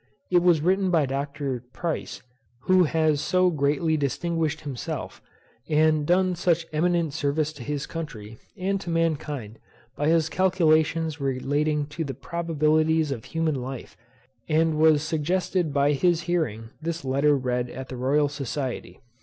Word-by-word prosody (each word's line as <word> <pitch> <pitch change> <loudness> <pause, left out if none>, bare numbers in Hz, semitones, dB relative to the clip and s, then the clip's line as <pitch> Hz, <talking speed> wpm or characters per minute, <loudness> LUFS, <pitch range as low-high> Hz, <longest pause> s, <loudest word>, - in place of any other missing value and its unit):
It 175 -1 +5
was 175 -3 +4
written 190 +3 +2
by 165 -5 +3
Dr. 140 -2 -3
Price, 170 -3 -4 0.4
who 185 +2 +4
has 155 -2 +1
so 185 -1 +2
greatly 150 +1 +1
distinguished 160 +3 -1
himself, 135 -5 -5 0.5
and 155 -1 +3
done 185 +1 +3
such 170 -1 +1
eminent 170 -1 +1
service 145 +2 -1
to 145 - -9
his 145 -1 -3
country, 115 -10 -7 0.2
and 195 +1 -1
to 175 - -6
mankind, 150 -9 -2 0.4
by 145 - -1
his 165 -1 +3
calculations 160 -4 +2
relating 145 +3 0
to 160 +2 -4
the 135 -4 -5
probabilities 155 +1 +1
of 120 -5 -5
human 165 -1 -1
life, 130 0 -7 0.5
and 160 0 +2
was 155 -2 +5
suggested 165 +2 0
by 140 +1 +2
his 170 +3 +2
hearing 140 -11 -2
this 165 -2 -4
letter 140 +2 +3
read 125 -1 -1
at 130 +2 -8
the 130 - -6
Royal 140 +4 +2
Society. 140 -2 -5
155 Hz, 145 wpm, -25 LUFS, 140-165 Hz, 0.5 s, It